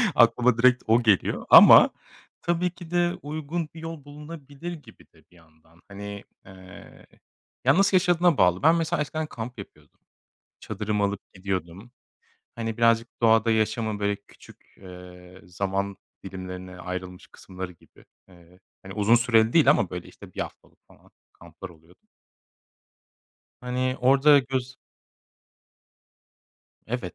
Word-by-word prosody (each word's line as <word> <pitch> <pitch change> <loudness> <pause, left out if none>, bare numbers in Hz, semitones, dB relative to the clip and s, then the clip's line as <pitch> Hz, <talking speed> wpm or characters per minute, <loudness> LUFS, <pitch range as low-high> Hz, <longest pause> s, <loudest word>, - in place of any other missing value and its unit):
Aklıma 120 0 +4
direkt 125 +1 +3
o 115 +2 +3
geliyor. 105 -4 +1
Ama - - +9 0.5
tabii 175 +1 0
ki 175 -1 -13
de 175 0 +1
uygun 155 +2 -5
bir 165 - -11
yol 165 -3 -8
bulunabilir 150 +2 -9
gibi 145 -9 -15
de 80 -2 -24
bir - - -23
yandan. 80 0 -25
Hani, 100 0 -9 0.2
aaa, - - -15 1.2
ya 135 +6 +4
nasıl 195 0 +3
yaşadığına 175 -3 +2
bağlı. 90 +3 +2
Ben 160 +2 +5
mesela 165 -2 -1
eskiden 155 +2 -4
kamp 120 -2 -8
yapıyordum. 100 - -14 0.6
Çadırımı 105 -1 -3
alıp 100 0 -5
gidiyordum. 95 +2 -5 0.7
Hani 115 -1 -5
birazcık 115 0 +1
doğada 115 0 +3
yaşamı 110 -1 -1
böyle 100 0 0
küçük, 100 - -20
eee, 90 0 -14
zaman 100 +2 -3 0.3
dilimlerine 90 -1 -8
ayrılmış 90 0 -7
kısımları 95 -1 -9
gibi. 85 - -23 0.2
Eee, 90 0 -20 0.2
hani, 95 0 -10
uzun 105 +3 +3
süreli 115 -1 +2
değil 155 -5 +5
ama, 120 - +2
böyle, 90 -1 -7
işte, - - -15
1 - - -9
haftalık - - -10
falan - - -23 0.2
kamplar 85 +3 -12
oluyor 80 +1 -20 1.7
Hani 125 +1 -2
orada 140 +3 +5
göz 130 -1 -4 2.1
Evet. 110 -7 -5
110 Hz, 130 wpm, -25 LUFS, 95-140 Hz, 2.1 s, Ama